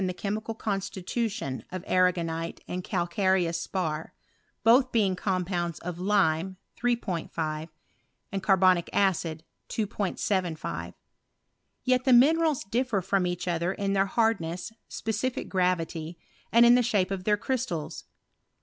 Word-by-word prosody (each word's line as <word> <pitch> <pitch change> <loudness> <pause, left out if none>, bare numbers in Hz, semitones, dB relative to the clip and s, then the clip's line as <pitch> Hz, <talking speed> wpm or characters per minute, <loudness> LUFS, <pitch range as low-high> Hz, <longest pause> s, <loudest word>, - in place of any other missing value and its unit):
the 180 - -3
chemical 215 +3 -3
constitution 195 - -3
(rf 185 0 -6
arragonite 170 -2 +1
and 180 0 -4
calcareous 175 -2 +1
spar, 160 -4 -3 0.5
both 250 +3 +5
being 200 -5 +2
coot 185 -1 -1
pounds 175 -3 -2
of 175 0 -6
Lime 185 -2 +1 0.2
3'5 165 -9 -2 0.7
Carbonic 185 -3 +4
acid. 165 -5 +1 0.2
2 215 -2 -2 0.3
75 180 -6 -2 0.9
Tet 255 0 +3
the 260 - +4
minerals 310 +4 +5
differ 235 +1 0
from 185 0 +1
each 180 0 -3
other 170 +1 0
in 195 0 -1
their 195 0 +2
hani 225 +2 +2
ness, 170 +6 -5
specific 225 +3 -3
gravity, 175 -3 -1 0.3
and 235 +1 +7
in 240 - +8
the 250 - +5
shape 205 -6 +1
of 190 -2 -3
their 210 -1 +3
crys 255 +3 -1
tals. 160 -2 -5
190 Hz, 130 wpm, -28 LUFS, 170-220 Hz, 0.9 s, in